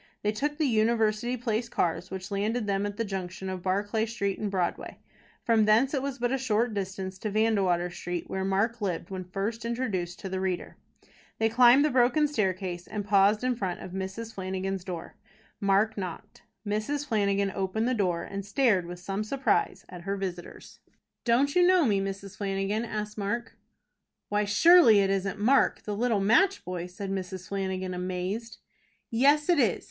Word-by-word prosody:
They 210 Hz, -, +2 dB
took 295 Hz, +7 st, -2 dB
the 315 Hz, -, +1 dB
University 225 Hz, 0 st, +1 dB
Place 230 Hz, -1 st, -2 dB
cars, 175 Hz, -1 st, -1 dB
which 190 Hz, 0 st, -7 dB
landed 215 Hz, +3 st, -1 dB
them 200 Hz, 0 st, 0 dB
at 205 Hz, 0 st, -7 dB
the 230 Hz, -, -1 dB
junction 190 Hz, -1 st, -5 dB
of 185 Hz, -1 st, -4 dB
Barclay 205 Hz, +4 st, 0 dB
Street 200 Hz, -4 st, -2 dB
and 210 Hz, -, -2 dB
Broadway. 185 Hz, -3 st, -2 dB, 0.5 s
From 225 Hz, -3 st, +3 dB
thence 230 Hz, +7 st, +4 dB
it 275 Hz, -, 0 dB
was 275 Hz, -1 st, -3 dB
but 245 Hz, -1 st, -1 dB
a 270 Hz, -, 0 dB
short 230 Hz, -2 st, +1 dB
distance 190 Hz, -1 st, -4 dB
to 215 Hz, -, -3 dB
Vandewater 195 Hz, -5 st, +1 dB
Street, 175 Hz, 0 st, -5 dB
where 190 Hz, 0 st, -3 dB
Mark 205 Hz, +5 st, 0 dB
lived 185 Hz, -2 st, -3 dB
when 185 Hz, -1 st, -4 dB
first 200 Hz, +5 st, -4 dB
introduced 210 Hz, -8 st, -2 dB
to -, -, -5 dB
the 190 Hz, 0 st, -3 dB
reader. 185 Hz, -2 st, -3 dB, 0.6 s
They 225 Hz, 0 st, +2 dB
climbed 250 Hz, +4 st, +6 dB
the 305 Hz, -, +1 dB
broken 255 Hz, +5 st, +3 dB
staircase, 185 Hz, -8 st, -2 dB
and 205 Hz, -2 st, -4 dB
paused 205 Hz, +2 st, +4 dB
in 255 Hz, -1 st, +1 dB
front 190 Hz, -6 st, -3 dB
of 185 Hz, -, -8 dB
Mrs. 190 Hz, +4 st, -5 dB
Flanagan's 190 Hz, 0 st, -3 dB
door. 175 Hz, -3 st, -7 dB, 0.4 s
Mark 200 Hz, +2 st, +2 dB
knocked. 180 Hz, -3 st, -7 dB, 0.2 s
Mrs. 215 Hz, +8 st, -2 dB
Flanagan 200 Hz, -4 st, +1 dB
opened 195 Hz, +4 st, -1 dB
the 255 Hz, -, +1 dB
door, 180 Hz, -7 st, 0 dB
and 200 Hz, +2 st, -5 dB
stared 200 Hz, -4 st, +2 dB
with 175 Hz, 0 st, -7 dB
some 195 Hz, +3 st, -3 dB
surprise 270 Hz, +5 st, 0 dB
at 180 Hz, -, -10 dB
her 195 Hz, +3 st, -3 dB
visitors. 180 Hz, -3 st, -7 dB, 0.5 s
"Don't 260 Hz, +4 st, +3 dB
you 360 Hz, -, +5 dB
know 360 Hz, -2 st, +5 dB
me, 200 Hz, -5 st, +2 dB
Mrs. 195 Hz, 0 st, -6 dB
Flanagan?" 200 Hz, +2 st, -1 dB
asked 210 Hz, -1 st, -5 dB
Mark. 235 Hz, +4 st, -3 dB, 0.7 s
"Why, 205 Hz, 0 st, +1 dB
surely 235 Hz, -, +7 dB
it 195 Hz, 0 st, +1 dB
isn't 195 Hz, +1 st, -1 dB
Mark, 255 Hz, +7 st, +3 dB
the 210 Hz, -, -3 dB
little 230 Hz, -1 st, +1 dB
match 230 Hz, -, +3 dB
boy?" 180 Hz, 0 st, -4 dB
said 195 Hz, +2 st, -6 dB
Mrs. 190 Hz, -1 st, -5 dB
Flanagan, 190 Hz, -1 st, -2 dB
amazed. 185 Hz, +5 st, -4 dB, 0.5 s
"Yes, 285 Hz, +6 st, +4 dB
it 350 Hz, -4 st, +4 dB
is. 225 Hz, -8 st, +2 dB
205 Hz, 180 wpm, -28 LUFS, 190-230 Hz, 0.7 s, surely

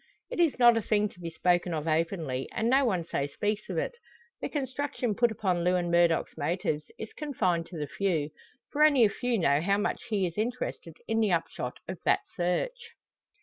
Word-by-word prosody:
It -, -, -4 dB
is 335 Hz, -4 st, +3 dB
not 240 Hz, -2 st, +6 dB
a -, -, +1 dB
thing 210 Hz, 0 st, +1 dB
to 180 Hz, -, -19 dB
be 170 Hz, -1 st, -5 dB
spoken 175 Hz, +1 st, +1 dB
of 155 Hz, +1 st, -3 dB
openly, 155 Hz, -5 st, -1 dB
and 225 Hz, -, 0 dB
no 270 Hz, +1 st, +5 dB
one 185 Hz, -8 st, 0 dB
so 140 Hz, -4 st, -1 dB
speaks 210 Hz, +8 st, -2 dB
of -, -, -3 dB
it. -, -, 0 dB, 0.5 s
The -, -, -2 dB
construction 265 Hz, -4 st, -2 dB
put 240 Hz, +3 st, +3 dB
upon 185 Hz, -5 st, 0 dB
Lewin 180 Hz, -1 st, +1 dB
Murdock's 170 Hz, -1 st, +3 dB
motives 155 Hz, -1 st, -1 dB
is 220 Hz, -, -7 dB
confined 185 Hz, -, -1 dB
to 175 Hz, -, -8 dB
the 150 Hz, -, -2 dB
few; 160 Hz, -3 st, -1 dB, 0.4 s
for 300 Hz, +1 st, +3 dB
only 285 Hz, -6 st, +6 dB
a -, -, +3 dB
few 245 Hz, +3 st, -1 dB
know 145 Hz, -5 st, +3 dB
how 200 Hz, +4 st, +2 dB
much 205 Hz, -, -2 dB
he 205 Hz, -4 st, +1 dB
is 175 Hz, +3 st, -4 dB
interested 220 Hz, -8 st, -3 dB
in 225 Hz, 0 st, +1 dB
the 215 Hz, -3 st, +2 dB
upshot 165 Hz, -7 st, -2 dB
of 185 Hz, -1 st, -5 dB
that -, -, +3 dB
search. 325 Hz, -, -2 dB
185 Hz, 200 wpm, -29 LUFS, 165-230 Hz, 0.5 s, not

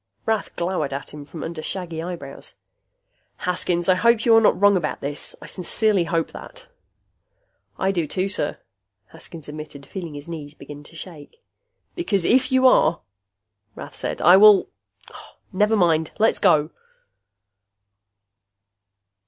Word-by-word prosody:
Rath 220 Hz, -2 st, -2 dB
glowered 170 Hz, -5 st, -2 dB
at 140 Hz, -, -7 dB
him 150 Hz, -1 st, -9 dB
from 155 Hz, +2 st, -9 dB
under 165 Hz, -1 st, -6 dB
shaggy 170 Hz, -1 st, -5 dB
eyebrows. 165 Hz, -6 st, -8 dB, 0.9 s
"Haskins, 175 Hz, -1 st, -1 dB
I 185 Hz, -, +6 dB
hope 230 Hz, +4 st, +2 dB
you 230 Hz, -2 st, +6 dB
are 225 Hz, -, +6 dB
not 215 Hz, -, +3 dB
wrong 205 Hz, 0 st, +5 dB
about 170 Hz, -5 st, -2 dB
this. 145 Hz, +1 st, -5 dB
I -, -, -11 dB
sincerely 195 Hz, 0 st, 0 dB
hope 165 Hz, -1 st, -1 dB
that." -, -, -11 dB, 1.1 s
"I 190 Hz, -, +1 dB
do 170 Hz, -5 st, -1 dB
too, 185 Hz, +5 st, -2 dB
sir," 195 Hz, -7 st, -2 dB, 0.5 s
Haskins 160 Hz, -4 st, -12 dB
admitted, 150 Hz, -2 st, -9 dB
feeling 170 Hz, -4 st, -7 dB
his 145 Hz, +1 st, -9 dB
knees 155 Hz, -3 st, -8 dB
begin 145 Hz, 0 st, -11 dB
to 165 Hz, -, -15 dB
shake. 170 Hz, -, -11 dB, 0.5 s
"Because 205 Hz, -, -1 dB
if 255 Hz, +2 st, +3 dB
you 260 Hz, 0 st, +3 dB
are," 170 Hz, -9 st, +4 dB, 0.7 s
Rath -, -, -10 dB
said, -, -, -4 dB
"I 180 Hz, +2 st, +8 dB
will... 210 Hz, -1 st, +6 dB, 0.8 s
Never 210 Hz, +3 st, +2 dB
mind. 165 Hz, -5 st, +2 dB
Let's 220 Hz, +1 st, +2 dB
go!" 155 Hz, -5 st, +3 dB
175 Hz, 140 wpm, -22 LUFS, 155-205 Hz, 1.1 s, I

